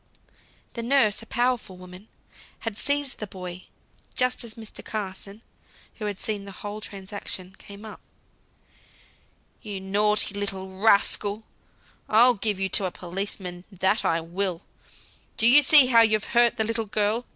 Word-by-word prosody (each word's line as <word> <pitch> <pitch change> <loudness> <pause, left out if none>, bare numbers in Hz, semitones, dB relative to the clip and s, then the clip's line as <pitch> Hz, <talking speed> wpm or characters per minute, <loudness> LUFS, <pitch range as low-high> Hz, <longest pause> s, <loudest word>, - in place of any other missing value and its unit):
The 235 - -5
nurse, 230 -4 +2
a 225 - -13
powerful 245 -7 -1
woman, 180 +3 -13 0.5
had 225 -2 -4
seized 285 +3 -1
the 210 - -5
boy, 180 -1 -9 0.5
just 250 0 0
as 230 -2 -8
Mr. 220 -1 -9
Carson 200 +1 -6 0.6
(who 215 - -4
had 205 -2 -3
seen 210 -1 -3
the 200 - -9
whole 205 +2 -7
transaction) 195 -2 -6
came 200 +2 -12
up. 215 - -10 1.6
"You 205 -3 -6
naughty 205 +2 +1
little 195 -2 -4
rascal! 205 0 +2 0.7
I'll 240 +4 +6
give 205 -2 -1
you 195 - 0
to 195 - 0
a 185 - -2
policeman, 180 0 -6
that 190 +3 0
I 165 0 +1
will! 175 +1 -3 0.7
Do 220 - +2
you 260 +5 +8
see 290 -1 +9
how 235 -2 +5
you've 215 -2 +3
hurt 240 -1 +4
the 220 - 0
little 225 0 -2
girl? 215 +4 0
210 Hz, 150 wpm, -25 LUFS, 190-225 Hz, 1.6 s, see